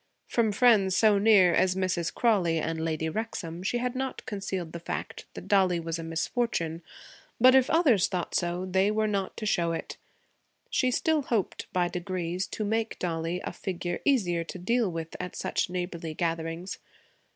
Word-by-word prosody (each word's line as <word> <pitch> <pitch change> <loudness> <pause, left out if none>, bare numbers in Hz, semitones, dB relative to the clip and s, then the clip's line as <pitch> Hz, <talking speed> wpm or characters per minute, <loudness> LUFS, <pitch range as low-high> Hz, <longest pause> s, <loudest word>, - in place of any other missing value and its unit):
From 230 -3 +1
friends 205 -5 +4
so 210 -1 +4
near 200 -4 +6
as 185 -1 +3
Mrs. 185 -3 -1
Crawley 190 -9 +2
and 160 0 -2
Lady 160 -1 -1
Wrexham 170 -3 -4
she 200 +6 -1
had 245 0 -1
not 265 0 -4
concealed 190 -5 -4
the 170 - -6
fact 170 - -5
that - - -8
Dollie 185 -4 +3
was 165 0 -4
a - - -5
misfortune; 165 0 -2 0.6
but 255 +2 +7
if 265 -1 +5
others 265 - +4
thought 180 -2 -3
so, 175 +1 -1
they 190 +2 +2
were 215 +1 +1
not 200 -3 -2
to 215 - -4
show 170 -5 +1
it. - - -5 0.7
She 255 -3 +2
still 315 +4 +1
hoped, 230 -7 -2
by 180 -1 +1
degrees, 180 0 -3
to 215 - -4
make 225 +2 -1
Dollie 170 0 -2
a - - -4
figure 175 -2 -4
easier 185 -12 +2
to 165 - -8
deal 220 +3 +1
with 165 -1 -6
at 180 -1 -5
such - - -1
neighborly 175 -3 -4
gatherings. 165 +2 -3
185 Hz, 175 wpm, -28 LUFS, 170-220 Hz, 0.7 s, but